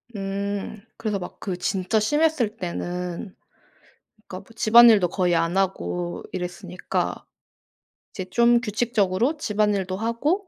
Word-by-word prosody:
음. 200 Hz, +1 st, -4 dB, 0.2 s
그래서 210 Hz, -3 st, -2 dB
막 180 Hz, -, -9 dB
그 185 Hz, -3 st, -4 dB
진짜 190 Hz, +4 st, 0 dB
심했을 270 Hz, -2 st, +1 dB
때는 180 Hz, 0 st, -5 dB, 0.9 s
그러니까 185 Hz, -, -7 dB
뭐 -, -, -17 dB
집안일도 225 Hz, -4 st, +7 dB
거의 180 Hz, -1 st, +1 dB
안 165 Hz, +2 st, 0 dB
하고 90 Hz, -, -2 dB
이랬으니까 180 Hz, 0 st, -4 dB, 0.9 s
이제 185 Hz, -, -6 dB
좀 235 Hz, +5 st, +4 dB
규칙적으로 225 Hz, +3 st, 0 dB
집안일도 210 Hz, -6 st, 0 dB
하고 275 Hz, -, -1 dB
200 Hz, 265 characters per minute, -24 LUFS, 180-230 Hz, 0.9 s, 집안일도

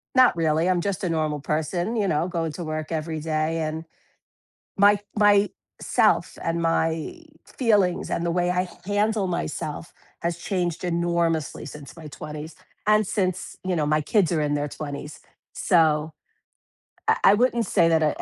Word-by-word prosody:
not 255 Hz, -7 st, +6 dB
really, 160 Hz, +2 st, +2 dB
I'm 180 Hz, -2 st, +2 dB
just 200 Hz, 0 st, -2 dB
a 180 Hz, -, 0 dB
normal 155 Hz, -2 st, -1 dB
person, 165 Hz, +9 st, -1 dB
you 205 Hz, -3 st, +1 dB
know, 160 Hz, +1 st, +1 dB
going 165 Hz, -3 st, -2 dB
to 175 Hz, -, -6 dB
work 155 Hz, -1 st, -4 dB
every 160 Hz, 0 st, -2 dB
day, 155 Hz, +1 st, -1 dB
and 160 Hz, +1 st, -3 dB, 0.9 s
my 205 Hz, +1 st, +5 dB, 0.2 s
my 205 Hz, -1 st, +5 dB, 0.3 s
myself -, -, +2 dB
and 165 Hz, 0 st, -1 dB
my 165 Hz, -, 0 dB, 0.3 s
feelings, 205 Hz, -8 st, +1 dB
and 170 Hz, -, -1 dB
the 170 Hz, -, 0 dB
way 175 Hz, +1 st, +1 dB
I 180 Hz, 0 st, 0 dB, 0.2 s
handle 205 Hz, 0 st, +1 dB
myself 160 Hz, -2 st, -4 dB, 0.3 s
has 170 Hz, 0 st, -1 dB
changed 175 Hz, -1 st, -2 dB
enormously 170 Hz, -2 st, 0 dB
since 150 Hz, +1 st, -10 dB
my 160 Hz, -2 st, -10 dB
20s, 150 Hz, +1 st, -8 dB, 0.3 s
and 215 Hz, 0 st, +4 dB
since 185 Hz, -2 st, -2 dB
you 185 Hz, -1 st, 0 dB
know, 150 Hz, -, +1 dB
my 155 Hz, +1 st, +2 dB
kids 185 Hz, +3 st, +2 dB
are 160 Hz, -, +1 dB
in 145 Hz, -1 st, 0 dB
their 145 Hz, 0 st, -1 dB
20s, 145 Hz, 0 st, -7 dB, 0.4 s
so 160 Hz, -9 st, +2 dB, 1.0 s
I -, -, +5 dB
I 195 Hz, -, +8 dB
wouldn't 235 Hz, -1 st, +2 dB
say 165 Hz, -, +3 dB
that 165 Hz, -1 st, +4 dB
to 155 Hz, -1 st, 0 dB
170 Hz, 165 wpm, -24 LUFS, 155-185 Hz, 1.0 s, I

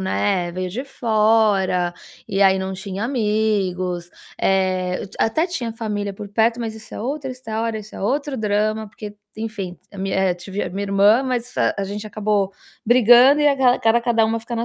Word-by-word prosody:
né, 100 Hz, -, 0 dB
veio 185 Hz, +1 st, -3 dB
de 240 Hz, +8 st, -4 dB
fora, 215 Hz, -7 st, +2 dB, 0.4 s
e 195 Hz, -, -1 dB
aí 190 Hz, -1 st, +5 dB
não 190 Hz, 0 st, -3 dB
tinha 195 Hz, +2 st, -5 dB
amigos, 205 Hz, -7 st, -1 dB, 0.3 s
eh, 185 Hz, -1 st, +1 dB
eu -, -, -8 dB
até 310 Hz, +10 st, +1 dB
tinha 250 Hz, -11 st, -4 dB
família 210 Hz, -3 st, -3 dB
por 205 Hz, -, -8 dB
perto, 225 Hz, +3 st, +1 dB
mas 225 Hz, -2 st, -4 dB
isso 220 Hz, 0 st, -12 dB
é -, -, -6 dB
outra 270 Hz, +3 st, -3 dB
história, 225 Hz, -3 st, -3 dB
isso 215 Hz, 0 st, -11 dB
é -, -, -7 dB
outro 280 Hz, +7 st, -1 dB
drama, 215 Hz, +1 st, 0 dB
porque, 210 Hz, 0 st, -9 dB, 0.2 s
enfim, 215 Hz, -5 st, -5 dB
t -, -, -30 dB
a -, -, -9 dB
minha, 190 Hz, 0 st, -2 dB
eh 190 Hz, -2 st, +2 dB
tive 190 Hz, +3 st, -5 dB
a -, -, -4 dB
minha 195 Hz, +2 st, -3 dB
irmã, 200 Hz, +5 st, +4 dB
mas, 250 Hz, -2 st, -3 dB
hã, -, -, +2 dB
a 200 Hz, -, -2 dB
gente 205 Hz, +2 st, -5 dB
acabou 210 Hz, -2 st, 0 dB, 0.4 s
brigando 245 Hz, +4 st, +6 dB
e 295 Hz, -, +5 dB
agala 265 Hz, -3 st, +3 dB
cada 225 Hz, +1 st, +3 dB
cada 235 Hz, -2 st, +2 dB
uma 225 Hz, +1 st, -1 dB
fica 235 Hz, +1 st, -6 dB
na 230 Hz, -, -1 dB
215 Hz, 195 wpm, -21 LUFS, 195-230 Hz, 0.4 s, brigando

